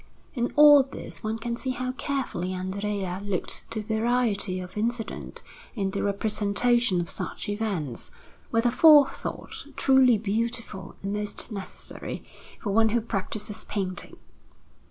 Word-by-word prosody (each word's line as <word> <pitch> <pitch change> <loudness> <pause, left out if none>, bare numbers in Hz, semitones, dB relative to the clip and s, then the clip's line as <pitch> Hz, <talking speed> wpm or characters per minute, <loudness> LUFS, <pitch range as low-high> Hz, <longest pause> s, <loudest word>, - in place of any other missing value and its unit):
In 240 -2 -1
all 295 -1 +9
this 265 -2 -6
one 220 +1 -1
can 235 +1 -3
see 260 +2 -4
how 255 0 -2
carefully 255 -9 -2
Andrea 190 0 -3
looked 200 -3 -2
to 220 -2 -4
variety 220 -4 0
of 180 0 -8
incident 225 +1 -3 0.3
in 195 -3 -1
the - - -2
representation 205 +1 +2
of 170 - -2
such - - -3
events, 200 - -3 0.4
with 230 +1 +1
a 240 - +4
forethought 295 0 +4
truly 265 -3 +5
beautiful 220 -2 -3
and 195 +1 -2
most 210 +2 -4
necessary 195 -3 -6 0.3
for 205 - -3
one 220 +1 +4
who 235 +2 +2
practises 210 0 -4
painting. 185 -3 -4
215 Hz, 135 wpm, -26 LUFS, 195-240 Hz, 0.4 s, all